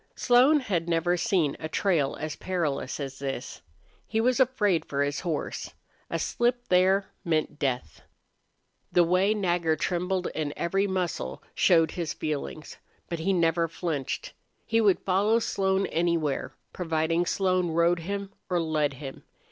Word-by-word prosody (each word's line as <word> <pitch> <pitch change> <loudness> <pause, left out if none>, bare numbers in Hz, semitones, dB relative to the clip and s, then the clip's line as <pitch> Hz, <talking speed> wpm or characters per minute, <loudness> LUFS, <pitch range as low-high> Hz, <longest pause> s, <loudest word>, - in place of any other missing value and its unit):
Slone 265 +5 +5
had 175 -8 -1
never 170 +1 +2
seen 175 -6 +1
a 155 - -5
trail 160 -7 +1
as 155 -1 -4
perilous 160 -8 -2
as 135 -2 -5
this. 135 -2 -5 0.5
He 220 - 0
was 250 +3 +2
afraid 210 -9 +2
for 140 0 -1
his 145 0 -2
horse. 165 -4 -4 0.3
A - - -1
slip 245 0 0
there 190 +2 +4 0.2
meant 155 -2 -1
death. 125 - -2 0.9
The 175 - +5
way 185 +5 +3
Nagger 175 -5 +1
trembled 180 +3 -1
in 150 -2 -3
every 195 +4 +1
muscle 180 - -3
showed 165 -3 +4
his 170 -3 -3
feelings. 155 0 -4 0.3
But 170 - -3
he 180 +5 +1
never 165 -2 +2
flinched. 160 -4 -4 0.3
He 225 0 +2
would 200 -4 +4
follow 200 +4 +2
Slone 195 -3 +1
anywhere, 165 -4 0 0.2
providing 165 0 0
Slone 185 -2 +1
rode 170 +1 +2
him 200 +3 -4 0.2
or 180 -1 +1
led 155 -3 0
him. 135 0 -8
175 Hz, 145 wpm, -27 LUFS, 155-195 Hz, 0.9 s, Slone